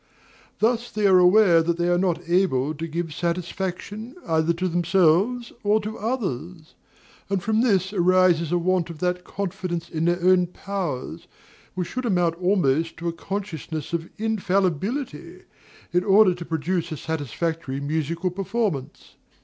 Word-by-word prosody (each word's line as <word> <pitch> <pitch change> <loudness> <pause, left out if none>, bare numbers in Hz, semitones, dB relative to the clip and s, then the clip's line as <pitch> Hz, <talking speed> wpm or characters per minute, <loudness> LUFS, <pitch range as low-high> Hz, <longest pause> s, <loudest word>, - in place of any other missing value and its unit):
Thus 235 +2 +1
they 210 -1 -1
are 190 -2 +6
aware 180 -2 +6
that 170 +1 0
they 175 0 0
are 175 0 +3
not 175 -2 -1
able 165 -6 +2
to 160 +2 -5
give 165 0 -4
satisfaction, 180 - -4
either 160 +1 +2
to 185 +2 -2
themselves 180 +7 +2
or 210 +1 +3
to 215 +1 -5
others; 180 - -4 0.6
and 195 -3 -1
from 220 +1 +2
this 195 -5 +2
arises 180 -3 +3
a 175 - +3
want 180 0 +1
of 165 - -8
that 180 +2 -1
confidence 180 -3 -4
in 160 0 -1
their 175 +1 +2
own 180 -1 +4
powers, 180 -7 -5 0.5
which 180 -2 -3
should 255 -1 -3
amount 175 -5 +2
almost 165 -4 +1
to 170 +1 -2
a - - -4
consciousness 165 -5 -5
of 170 0 -2
infallibility, 205 - -1 0.5
in 180 +1 +3
order 195 -1 +5
to 175 -1 -8
produce 170 +2 -2
a 155 - -4
satisfactory 160 -1 -3
musical 160 +5 -2
performance. 195 - -3
180 Hz, 150 wpm, -24 LUFS, 165-195 Hz, 0.6 s, are